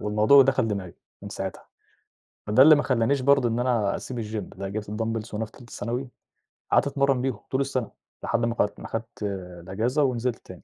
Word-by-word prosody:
والموضوع 105 Hz, +7 st, +5 dB
دخل 130 Hz, -4 st, +1 dB
دماغي 95 Hz, -4 st, -4 dB, 0.3 s
من -, -, -7 dB
ساعتها. -, -, -6 dB, 0.8 s
ما 105 Hz, -, -2 dB
ده 130 Hz, -, +8 dB
اللي 155 Hz, +1 st, +9 dB
ما 145 Hz, -, +1 dB
خلانيش 130 Hz, +2 st, +1 dB
برضه 135 Hz, -3 st, +4 dB
إن 115 Hz, +2 st, -1 dB
أنا 115 Hz, -5 st, +1 dB
أسيب 125 Hz, -2 st, -6 dB
الgym 105 Hz, -3 st, -6 dB
لأ، 95 Hz, 0 st, -4 dB
جبت 105 Hz, 0 st, -5 dB
الدامبلز 115 Hz, 0 st, -3 dB
وانا 110 Hz, +1 st, -2 dB
في 110 Hz, -, -17 dB
تالتة 120 Hz, -3 st, -15 dB
ثانوي، 120 Hz, +4 st, -4 dB, 0.6 s
قعدت -, -, +4 dB
أتمرن 140 Hz, -2 st, +1 dB
بيهم 130 Hz, -2 st, -2 dB
طول 135 Hz, +1 st, +1 dB
السنة، 130 Hz, -4 st, -2 dB, 0.3 s
لحد 115 Hz, 0 st, 0 dB
ما 115 Hz, 0 st, -1 dB
قل 105 Hz, -, +2 dB
ما -, -, -8 dB
خدت 115 Hz, -1 st, -6 dB, 0.4 s
الأجازة 115 Hz, -, 0 dB
ونزلت 125 Hz, -2 st, 0 dB
تاني. -, -, -11 dB
115 Hz, 200 wpm, -25 LUFS, 110-130 Hz, 0.8 s, اللي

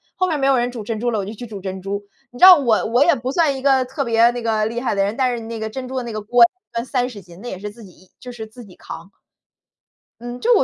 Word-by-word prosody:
后 370 Hz, -, +1 dB
面 330 Hz, -, 0 dB
儿 -, -, -5 dB
没 270 Hz, -, +1 dB
有 270 Hz, -1 st, +4 dB
人 245 Hz, +1 st, 0 dB
煮 235 Hz, -3 st, -7 dB
珍 220 Hz, +1 st, -4 dB
珠 240 Hz, +1 st, 0 dB
了， 220 Hz, -, -1 dB
我 195 Hz, -, -3 dB
就 210 Hz, -, -6 dB
去 240 Hz, +3 st, -8 dB
煮 215 Hz, -4 st, -8 dB
珍 190 Hz, 0 st, -5 dB
珠。 200 Hz, +2 st, -4 dB, 0.3 s
你 245 Hz, -, -12 dB
知 -, -, +8 dB
道 370 Hz, -1 st, +11 dB
我 245 Hz, -8 st, +1 dB
我 245 Hz, +4 st, +4 dB
也 340 Hz, -, +5 dB
不 255 Hz, -1 st, -3 dB
算 305 Hz, -2 st, +2 dB
一 -, -, -7 dB
个 265 Hz, -1 st, +3 dB
特 275 Hz, +3 st, -3 dB
别 235 Hz, -1 st, +4 dB
那 245 Hz, 0 st, -5 dB
个 220 Hz, -2 st, 0 dB
厉 230 Hz, +2 st, -3 dB
害 245 Hz, -, -1 dB
的 195 Hz, -, +2 dB
人， 200 Hz, +2 st, -2 dB
但 255 Hz, -1 st, +1 dB
是 230 Hz, -, -7 dB
那 225 Hz, 0 st, -6 dB
个 220 Hz, 0 st, -3 dB
珍 255 Hz, +3 st, -6 dB
珠 260 Hz, -, -5 dB
的 255 Hz, -, -2 dB
那 235 Hz, -, -6 dB
个 215 Hz, -, -4 dB
锅 235 Hz, +3 st, +4 dB, 0.3 s
算 230 Hz, -, -2 dB
30 250 Hz, -5 st, -2 dB
斤， 175 Hz, -1 st, -15 dB
那 245 Hz, -, -6 dB
也 185 Hz, -, -6 dB
是 210 Hz, +2 st, -6 dB
自 225 Hz, +2 st, -14 dB
己 185 Hz, -1 st, -18 dB
就 250 Hz, -, -9 dB
是 225 Hz, -2 st, -8 dB
自 230 Hz, +2 st, -13 dB
己 185 Hz, -, -16 dB
扛。 170 Hz, +4 st, -10 dB, 1.1 s
嗯， 240 Hz, +1 st, -6 dB
就 485 Hz, -, +4 dB
我 440 Hz, -, +4 dB
235 Hz, 335 characters per minute, -20 LUFS, 215-255 Hz, 1.1 s, 道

